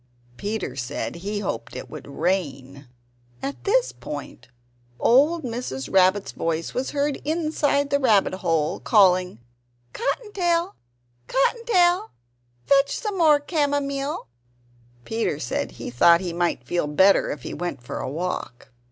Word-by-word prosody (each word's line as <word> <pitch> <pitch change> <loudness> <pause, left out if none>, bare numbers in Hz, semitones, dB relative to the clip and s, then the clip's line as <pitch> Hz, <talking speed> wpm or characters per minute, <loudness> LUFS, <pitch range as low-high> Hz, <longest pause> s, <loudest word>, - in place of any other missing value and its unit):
Peter 205 - -4
said 135 +5 -4
he 205 +4 -3
hoped 115 - -4
that - - -6
it - - -14
would - - -9
rain. 140 -4 -2 0.6
At 275 +1 -5
this - - +2
point - - -8 0.5
old 295 +7 +4
Mrs. 230 - -5
Rabbit's 190 +1 +3
voice 165 0 -2
was 255 +1 -2
heard 285 0 -1
inside 300 -3 0
the 280 - +3
rabbit 220 -9 +3
hole, 165 -5 0
calling: 185 - +3 0.6
"Cotton 410 - -3
tail! 345 0 +1 0.5
Cotton 460 - +1
tail! 365 0 +3 0.6
fetch 280 0 +3
some 425 -4 -3
more 305 -3 +6
camomile!" 285 -2 -1 0.8
Peter 225 -9 -1
said 125 - -3
he - - -7
thought 170 +8 +6
he 175 -2 -4
might 170 -7 -1
feel 175 +3 -1
better 190 +7 +4
if 135 - -5
he - - -6
went 170 -8 -5
for 135 - -5
a - - -3
walk. 150 -6 -4
210 Hz, 140 wpm, -24 LUFS, -, 0.8 s, more